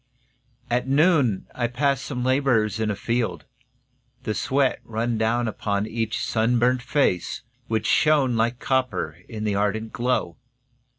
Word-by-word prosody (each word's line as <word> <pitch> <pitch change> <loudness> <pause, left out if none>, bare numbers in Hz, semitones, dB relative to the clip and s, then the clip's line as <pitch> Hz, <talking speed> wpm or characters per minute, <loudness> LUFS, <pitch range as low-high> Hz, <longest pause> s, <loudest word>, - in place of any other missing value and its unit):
At 125 +1 0
noon 140 - +3
I 120 -1 -1
passed 135 +2 0
some 135 -3 -4
labourers 125 -5 +2
in 110 -1 0
a 105 - -1
field. 115 +3 -2 0.8
The 110 - -1
sweat 135 +3 +1
ran 115 0 -2
down 120 +2 +1
upon 100 -1 -1
each 110 0 -2
sunburnt 120 +2 +2
face, 125 - 0 0.2
Which 110 -1 -1
shone 145 -5 +3
like 115 +2 +1
copper 130 -1 -1
in 110 -3 -5
the 105 -1 0
ardent 105 +2 -1
glow. 120 -8 -1
120 Hz, 135 wpm, -24 LUFS, 110-130 Hz, 0.8 s, noon